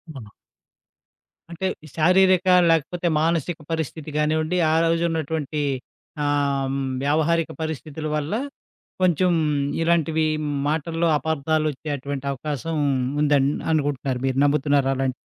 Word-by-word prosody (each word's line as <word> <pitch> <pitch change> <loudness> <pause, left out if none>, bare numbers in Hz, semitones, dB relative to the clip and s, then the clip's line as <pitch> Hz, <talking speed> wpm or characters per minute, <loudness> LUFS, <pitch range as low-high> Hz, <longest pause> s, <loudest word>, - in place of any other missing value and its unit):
ఆ! 115 -6 -9 1.2
అంటే 180 +3 -2 0.2
ఈ - - -11
శారీరక, 185 +3 +4 0.2
లేకపోతే 165 +2 +1
మానసిక 165 0 0
పరిస్థితి 160 -1 -4
గానివ్వండి, 155 +3 +1 0.2
ఆరోజున్నటువంటీ 160 -2 0 0.6
ఆహ్, 140 -2 0
హ్మ్, 135 0 -2 0.2
వ్యావహారిక 160 +3 +1
పరిస్థితులు 155 0 -4
వల్ల, 150 +4 -2 0.7
కొంచెం 180 0 +3 0.5
ఇలాంటివి 165 -1 +2 0.4
మాటల్లో 165 +2 0
అపార్థాలొచ్చేటటువంటి 145 -2 -2
అవకాశం 150 +3 -4 0.5
ఉందని 145 -2 +3 0.2
అనుకుంటున్నారు. 140 -4 -1
మీరు 130 -1 0
నమ్ముతున్నారలాంట్ 135 -2 +1
155 Hz, 90 wpm, -23 LUFS, 140-165 Hz, 1.2 s, శారీరక